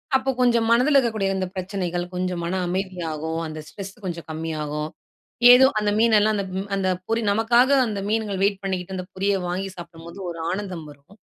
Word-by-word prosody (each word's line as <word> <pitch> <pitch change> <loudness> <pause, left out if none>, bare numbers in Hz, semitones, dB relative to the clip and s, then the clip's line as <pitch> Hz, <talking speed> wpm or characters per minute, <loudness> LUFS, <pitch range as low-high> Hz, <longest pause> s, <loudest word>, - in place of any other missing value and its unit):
அப்போ 265 0 +1
கொஞ்சம் 235 -2 +3
மனதுல 250 +5 +4
இருக்கக்கூடிய 220 -7 +1
இந்த 190 -1 -1
பிரச்சனைகள் 180 -2 -2
கொஞ்சம் 180 -1 -2
மன 185 +2 -1
அமைதியாகும். 170 -4 -3
அந்த 155 0 -7
ஸ்ட்ரெஸ் 195 +3 -8
கொஞ்சம் 170 -2 -5
கம்மியாகும். 155 -1 -4 0.6
ஏதோ 255 +1 +8
அந்த 210 -1 0
மீனெல்லாம் 215 -1 +4
அந்த 200 -1 -2 0.3
அந்த 195 -1 0 0.2
பொரி 225 +1 0
நமக்காக 235 +4 +4 0.2
அந்த 210 -2 -3
மீன்கள் 215 -3 -1
வெயிட் 200 -1 +1
பண்ணிக்கிட்டு, 190 -1 -3
அந்த 185 - -5
பொரிய 200 +2 +1
வாங்கி 185 +2 -3
சாப்பிடும்போது, 170 +1 -10
ஒரு 170 -1 -7
ஆனந்தம் 185 -4 -4
வரும். 145 +7 -19
190 Hz, 165 wpm, -23 LUFS, 170-215 Hz, 0.6 s, ஏதோ